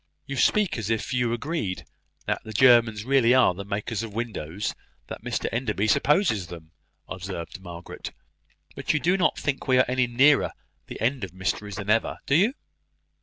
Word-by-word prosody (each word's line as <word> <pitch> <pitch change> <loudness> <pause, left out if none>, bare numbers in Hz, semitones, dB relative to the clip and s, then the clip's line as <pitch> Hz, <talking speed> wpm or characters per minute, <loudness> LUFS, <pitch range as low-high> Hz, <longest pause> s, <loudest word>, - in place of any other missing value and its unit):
'" - - -48
"You 140 - -5
speak 195 - +2
as 110 -1 -4
if 115 +3 -1
you 125 -2 +1
agreed 120 - -3 0.4
that - - -2
the 110 - -8
Germans 115 -3 +5
really 130 -2 +4
are 130 -7 +5
the 100 +3 -7
makers 105 +2 -3
of 110 -3 -7
windows 105 -5 -3 0.3
that - - -9
Mr - - -2
Enderby 110 -4 -1
supposes 110 - +2
them," 80 -2 -11 0.4
observed 95 -1 -6
Margaret; 85 -2 -8 0.6
"but - - -1
you - - +2
do 180 +4 +2
not 185 -2 +2
think 140 -2 -3
we 130 -1 +4
are 130 - +5
any 125 0 +1
nearer 135 +5 +4 0.3
the - - -8
end 125 0 0
of 90 -2 -6
mysteries 95 +2 -3
than 105 0 -2
ever, 115 +1 +1
do - - 0
you?" 205 - +4
115 Hz, 180 wpm, -25 LUFS, 100-130 Hz, 0.6 s, Germans